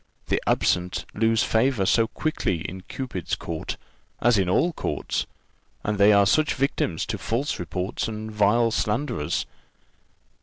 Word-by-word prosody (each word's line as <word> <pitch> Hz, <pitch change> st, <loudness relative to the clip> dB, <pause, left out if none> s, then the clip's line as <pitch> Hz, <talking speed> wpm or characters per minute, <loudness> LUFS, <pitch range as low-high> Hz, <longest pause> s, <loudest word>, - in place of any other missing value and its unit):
The -, -, +1 dB
absent 90 Hz, 0 st, +1 dB
lose 110 Hz, +1 st, +2 dB
favour 115 Hz, -3 st, +2 dB
so 115 Hz, +3 st, +3 dB
quickly 100 Hz, -, -1 dB
in 95 Hz, +3 st, -6 dB
Cupid's 110 Hz, -, -4 dB
court, 80 Hz, -2 st, -5 dB, 0.4 s
as 120 Hz, 0 st, +4 dB
in 95 Hz, -2 st, +1 dB
all 165 Hz, -, +3 dB
other -, -, -8 dB
courts; -, -, -2 dB, 0.6 s
and 105 Hz, -1 st, -1 dB
they 100 Hz, +1 st, +7 dB
are 100 Hz, -1 st, +6 dB
such 150 Hz, +9 st, +3 dB
victims 130 Hz, -, 0 dB
to -, -, -4 dB
false 125 Hz, +6 st, -1 dB
reports 90 Hz, +2 st, -3 dB
and 110 Hz, 0 st, -5 dB
vile 110 Hz, +3 st, +3 dB
slanderers!" 105 Hz, -, -1 dB
105 Hz, 145 wpm, -25 LUFS, 95-120 Hz, 0.6 s, they